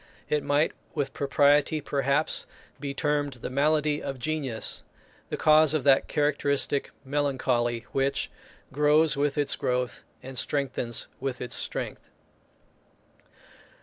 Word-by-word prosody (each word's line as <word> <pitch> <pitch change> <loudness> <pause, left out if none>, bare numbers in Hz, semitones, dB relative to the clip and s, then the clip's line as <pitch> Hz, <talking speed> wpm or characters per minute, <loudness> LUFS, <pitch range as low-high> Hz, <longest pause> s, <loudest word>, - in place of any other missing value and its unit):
It 150 - +1
might 145 +2 +2 0.2
with 140 -3 -2
propriety, 145 +2 +3
perhaps, 140 +1 0 0.3
be 140 -2 -4
termed 145 0 0
the 125 0 -7
malady 150 +2 +2
of 135 - -4
genius; 135 -4 -1 0.5
the - - -3
cause 155 -1 +5
of 150 - 0
that 135 -2 +4
characteristic 145 -1 0 0.2
melancholy 130 -4 0
which 135 0 0 0.4
"grows 150 +2 +4
with 145 +1 0
its 145 -1 +2
growth, 125 0 -2 0.2
and 130 -1 -4
strengthens 130 -4 -2
with 130 -2 -3
its 125 - -5
strength." - - -4
140 Hz, 115 wpm, -27 LUFS, 135-150 Hz, 0.5 s, cause